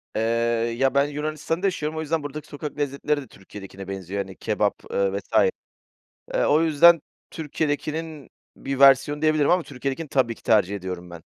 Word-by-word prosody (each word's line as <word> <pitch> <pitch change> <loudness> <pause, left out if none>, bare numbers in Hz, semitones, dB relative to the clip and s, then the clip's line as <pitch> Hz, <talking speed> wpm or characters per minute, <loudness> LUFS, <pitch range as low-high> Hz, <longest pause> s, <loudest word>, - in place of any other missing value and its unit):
Eee, 110 - 0 0.6
ya, 135 +1 +2
ben 140 +1 +4
Yunanistan 155 +3 -3
da - - +4
yaşıyorum. 155 -4 -2
O - - -1
yüzden 160 0 -1
buradaki 145 +1 -7
sokak 150 +1 -7
lezzetleri 145 +1 -1
de 135 - -11
Türkiye'dekine 95 0 -11
benziyor. 95 0 -4
Hani, 95 0 -12
kebap, - - -1
eee, 100 0 0
vs. - - -20 1.0
Eee, - - +2
o 150 +2 +4
yüzden 165 +1 +6 0.3
Türkiye'dekinin 155 0 -3 0.3
bir 135 -1 -4
versiyonu 140 +2 +5
diyebilirim 155 -2 +3
ama 180 0 +3
Türkiye'dekini 140 +2 -5
tabii 130 -4 +1
ki - - -21
tercih 100 -2 +3
ediyorum 90 -2 -6
ben. 85 -1 -10
145 Hz, 170 wpm, -24 LUFS, 105-155 Hz, 1.0 s, yüzden